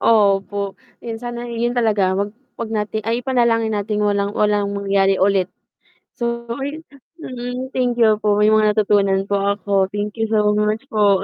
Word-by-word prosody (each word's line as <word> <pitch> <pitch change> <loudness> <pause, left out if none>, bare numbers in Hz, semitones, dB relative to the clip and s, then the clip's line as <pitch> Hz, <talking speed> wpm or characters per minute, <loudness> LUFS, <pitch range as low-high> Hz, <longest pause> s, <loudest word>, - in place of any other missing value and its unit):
Opo, 200 -2 +2 0.2
yun 230 -1 -5
sana 240 0 -6
i 235 - -6
yun 240 - +1
talaga. 215 -6 +2
Wag 200 +2 -1 0.3
wag 230 - -3
natin 215 0 -2
ay 235 +1 -1
ipanalangin 235 -3 +2
nating 210 0 -1
walang 200 -1 +1
walang 210 -1 +2
mangyari 195 -1 +2
ulit. 190 -1 +2 0.7
So, 235 0 -2 0.2
ayun 290 +4 -5 0.4
mm, 250 +1 -5
thank 250 -2 0
you 220 -3 +3
po, 210 -1 +2
may 210 +1 +4
mga 215 -1 +3
natutunan 200 -2 +2
po 200 0 -1
ako, 200 -1 +1
thank 205 +2 -5
you 225 - +1
so 210 -1 +2
much 210 +3 0
po. 205 -3 +3
210 Hz, 170 wpm, -20 LUFS, 200-230 Hz, 0.7 s, may